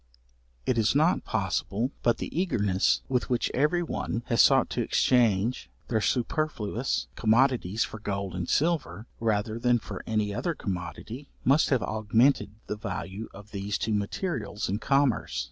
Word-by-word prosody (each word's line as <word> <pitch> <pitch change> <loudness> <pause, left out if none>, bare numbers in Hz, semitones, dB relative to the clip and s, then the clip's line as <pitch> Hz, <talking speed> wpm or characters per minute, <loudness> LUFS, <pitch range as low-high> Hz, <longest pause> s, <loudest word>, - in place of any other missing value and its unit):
It 120 -2 +1
is 110 +3 +2
not 160 +5 +3
possible, 105 +4 -1
but 120 - +2
the - - -6
eagerness 105 - +1
with 125 -2 -1
which 125 -2 0
every 150 +6 +2
one 120 -7 -3
has 115 - +5
sought - - +5
to - - -1
exchange 115 -2 +2 0.2
their 110 -2 +1
superfluous 125 -2 -1
commodities 115 -3 +2
for 110 - -6
gold 100 -2 -3
and 90 -1 -4
silver, 145 - 0
rather 110 0 0
than 120 0 +3
for - - -7
any 105 -2 0
other 170 - -2
commodity, 100 - -6 0.2
must 140 +5 +4
have 130 -5 +2
augmented 110 +4 +2 0.2
the 105 - -4
value 100 0 -5
of 100 +1 -13
these 100 0 -2
two 110 - -1
materials 105 - -2
in 100 +3 -1
commerce. 135 -3 +1
115 Hz, 150 wpm, -27 LUFS, 105-130 Hz, 0.2 s, has